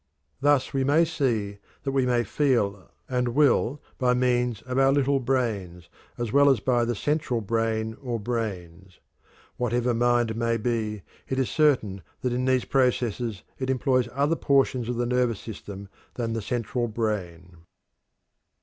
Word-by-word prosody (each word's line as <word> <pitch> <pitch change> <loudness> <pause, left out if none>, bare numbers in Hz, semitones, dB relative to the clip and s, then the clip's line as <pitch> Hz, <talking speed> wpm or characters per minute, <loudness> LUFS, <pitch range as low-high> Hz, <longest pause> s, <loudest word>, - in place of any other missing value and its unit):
Thus 145 -2 +2
we 135 -1 +1
may 150 +5 +4
see 115 -11 -1 0.2
that 135 - -1
we 135 -2 +1
may 120 -1 +2
feel 105 -6 0 0.2
and 125 -2 -1
will 145 -1 +3 0.2
by 125 -1 +3
means 125 -3 +1
of 130 +1 -2
our 135 0 +5
"little 140 0 +2
brains" 105 -10 -2 0.3
as 120 -3 -3
well 140 0 +6
as 135 -5 +3
by 120 +1 +1
the 120 0 -1
central 145 0 -1
brain 110 0 -1
or 120 -4 -3
brains. 95 -6 -5 0.6
Whatever 120 0 0
mind 120 -1 +2
may 115 0 0
be, 110 -3 -2 0.3
it 130 - -1
is 130 -2 0
certain 125 -11 +2 0.2
that 125 -1 -1
in 125 +1 -1
these 130 -1 +2
processes 120 -5 0 0.2
it 130 0 -2
employs 130 -1 +1
other 145 +5 +1
portions 135 -5 +1
of 125 - -1
the 120 +1 0
nervous 125 -3 +1
system 100 -3 -8 0.3
than 115 -2 -2
the 115 - -2
central 120 +2 -2
brain. 90 -6 -4
120 Hz, 155 wpm, -26 LUFS, 110-130 Hz, 0.6 s, well